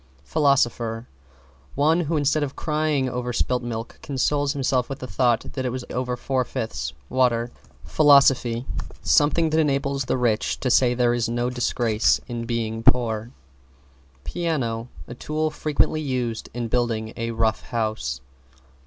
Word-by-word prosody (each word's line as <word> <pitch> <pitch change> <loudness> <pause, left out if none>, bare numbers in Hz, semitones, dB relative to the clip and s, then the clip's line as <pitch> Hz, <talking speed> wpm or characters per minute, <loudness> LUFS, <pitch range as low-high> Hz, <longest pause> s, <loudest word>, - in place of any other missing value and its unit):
=PHILOSOPHER= 120 - +1 0.7
One 155 +4 +3
who 165 -1 0
instead 150 +1 +2
of 140 -2 -3
crying 150 -3 0
over 125 0 -3
spilt 125 +1 0
milk 115 -1 -6
consoles 145 +1 0
himself 130 -3 0
with 135 - -4
the 130 - -7
thought 120 -2 0
that 130 - -3
it 125 - 0
was 125 0 -5
over 125 0 -2
four 130 0 0
fifths 110 - -4
water. 120 - +1 0.3
=PHILOSOPHY= 135 -5 +4 0.4
Something 155 +2 +3
that 160 - +2
enables 140 -2 0
the - - 0
rich 115 -3 0
to 125 - 0
say 125 0 +4
there 120 -1 +2
is 120 -1 0
no 120 +1 -1
disgrace 120 -3 +1
in 115 -1 -5
being 115 -1 -2
poor. 115 -2 +2 0.9
=PIANO= 125 - -2 0.2
A - - -7
tool 155 +4 -2
frequently 155 +1 0
used 125 -5 -3
in 120 0 -3
building 115 -2 -1
a 115 0 -3
Rough 110 -1 0
House. 110 - -2
125 Hz, 145 wpm, -24 LUFS, 115-140 Hz, 0.9 s, =PHILOSOPHY=